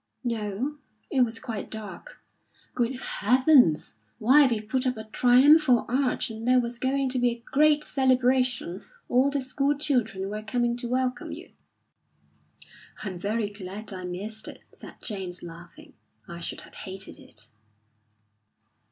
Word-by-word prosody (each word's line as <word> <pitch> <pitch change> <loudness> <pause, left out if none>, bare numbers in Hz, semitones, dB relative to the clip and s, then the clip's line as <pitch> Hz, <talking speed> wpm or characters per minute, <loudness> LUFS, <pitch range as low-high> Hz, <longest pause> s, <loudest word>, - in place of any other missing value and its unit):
"No, 230 +5 -3 0.3
it 265 - +2
was 230 -2 +1
quite 225 -2 -6
dark." 220 - -8 0.6
"Good 245 +1 0
heavens! 250 - +3 0.2
Why, 270 +6 +6
we've 215 -3 -2
put 260 +3 0
up 250 -2 -1
a 220 - -6
triumphal 250 +4 +5
arch, 255 -1 0
and 225 +1 -7
there 255 0 +5
was 235 -1 -2
going 270 +1 0
to 255 0 0
be 245 0 +3
a 235 0 -6
great 300 +1 +4
celebration. 255 - +1 0.2
All 255 +3 +3
the 280 -1 -1
school 275 +2 0
children 225 -10 -1
were 210 0 -4
coming 240 +2 0
to 240 -1 -5
welcome 255 0 -1
you." - - -9 1.5
"I'm 190 -4 -5
very 205 +2 -1
glad 205 +1 -7
I 185 -1 -6
missed 205 +5 -5
it," - - -10
said - - -12
James, 190 -5 -4
laughing. 170 0 -12 0.3
"I 170 0 -8
should 170 - -4
have - - -14
hated 190 0 -7
it." 110 -2 -12
240 Hz, 145 wpm, -26 LUFS, 205-260 Hz, 1.5 s, Why